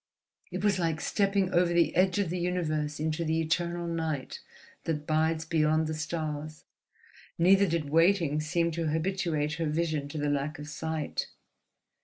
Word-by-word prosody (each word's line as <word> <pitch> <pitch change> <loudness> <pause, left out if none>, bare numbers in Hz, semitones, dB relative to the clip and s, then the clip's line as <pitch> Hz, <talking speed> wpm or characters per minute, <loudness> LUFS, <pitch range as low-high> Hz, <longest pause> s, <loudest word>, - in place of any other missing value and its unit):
It - - -4
was 200 -2 +2
like 165 -2 0
stepping 195 0 +1
over 175 0 +3
the 170 -1 +2
edge 185 +2 +3
of 195 -5 0
the 180 - -2
universe 155 -4 -1
into 155 +1 -1
the 160 0 0
eternal 170 +2 -1
night 160 -5 -3 0.5
that 150 -2 -2
bides 160 +1 +1
beyond 155 0 +2
the 155 - -2
stars. 155 -1 -4 0.7
Neither 195 +3 +5
did 160 -4 -2
waiting 165 -2 +3
seem 170 +2 0
to 165 0 -2
habituate 160 -2 0
her 160 - +1
vision 155 -2 -1
to 155 - -6
the 145 -1 0
lack 145 +2 -1
of 150 0 -8
light. 160 -2 -2
160 Hz, 160 wpm, -29 LUFS, 155-175 Hz, 0.7 s, Neither